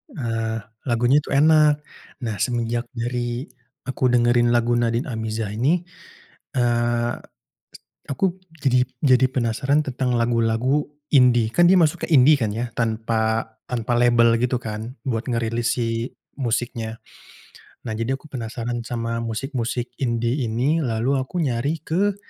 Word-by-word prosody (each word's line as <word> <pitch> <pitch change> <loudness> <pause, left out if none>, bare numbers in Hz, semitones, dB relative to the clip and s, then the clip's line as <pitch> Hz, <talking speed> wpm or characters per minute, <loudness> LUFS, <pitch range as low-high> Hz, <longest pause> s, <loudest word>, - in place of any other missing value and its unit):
Ah, 115 -4 -2 0.2
lagunya 120 +4 +3
tuh 140 - -3
enak. 150 0 +5 0.4
Nah 110 -3 -2
semenjak 120 +1 -1
dari 120 +1 -2 0.4
aku 130 -1 0
dengerin 120 0 +3
lagu 120 0 +2
Nadin 120 0 +1
Amizah 110 - -3
ini, 140 +11 +1 0.7
eee, 120 -1 +1 1.0
aku 180 +6 0 0.2
jadi 125 -2 +3 0.2
jadi 130 -3 +5
penasaran 130 +4 +1
tentang 130 -1 -1
lagu-lagu 115 +4 +1 0.3
indie, 125 -4 +5
kan 175 - +5
dia - - +6
masuk 165 0 +2
ke - - -14
indie 145 +2 +7
kan 110 -5 -1
ya, 120 +2 -3
tanpa 110 0 0 0.2
tanpa 120 -1 -1
label 120 -1 +4
gitu 125 0 +1
kan, 110 +1 -5
buat 115 -3 -2
ngerilis 115 0 0
si 115 +1 -2 0.2
musiknya. 115 -3 -2 0.9
Nah - - -3
jadi 115 +4 -1
aku - - -15
penasaran 120 -1 -4
sama 115 -1 -2
musik-musik 120 +1 -3
indie 120 +1 0
ini, 130 +9 +1
lalu 125 +3 0
aku 130 +7 -4
nyari 140 +4 -1
ke, 195 +5 +1
120 Hz, 130 wpm, -22 LUFS, 115-130 Hz, 1.0 s, indie